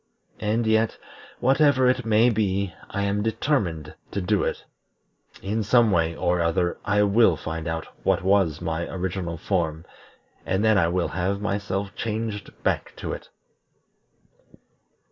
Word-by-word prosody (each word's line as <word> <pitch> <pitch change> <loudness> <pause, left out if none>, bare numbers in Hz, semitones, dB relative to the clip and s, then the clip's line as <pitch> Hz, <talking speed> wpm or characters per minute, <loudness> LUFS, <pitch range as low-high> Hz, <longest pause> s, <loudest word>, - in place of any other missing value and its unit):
And 110 +2 0
yet, 110 0 +2 0.4
whatever 135 0 +4
it 125 -1 +1
may 115 +3 +4
be, 100 -4 0 0.2
I 100 - -2
am 100 +1 0
determined 105 - -1 0.2
to - - -3
do 100 +2 +1
it. - - -3 0.8
In 105 +3 -1
some 115 +1 +4
way 85 -2 +1
or 90 0 +1
other 85 +1 0
I 105 0 +2
will 100 -4 +4
find 80 +1 -5
out 80 0 -3 0.2
what - - +1
was 95 -5 +2
my 80 +1 -2
original 90 -2 -3
form, 80 -3 -1 0.6
and 95 +3 0
then 110 -2 +5
I 85 - +3
will 90 +1 0
have 95 +2 -1
myself 100 -1 -2
changed 110 -2 -3
back - - -1
to - - -4
it." - - -9
100 Hz, 145 wpm, -24 LUFS, 85-110 Hz, 0.8 s, then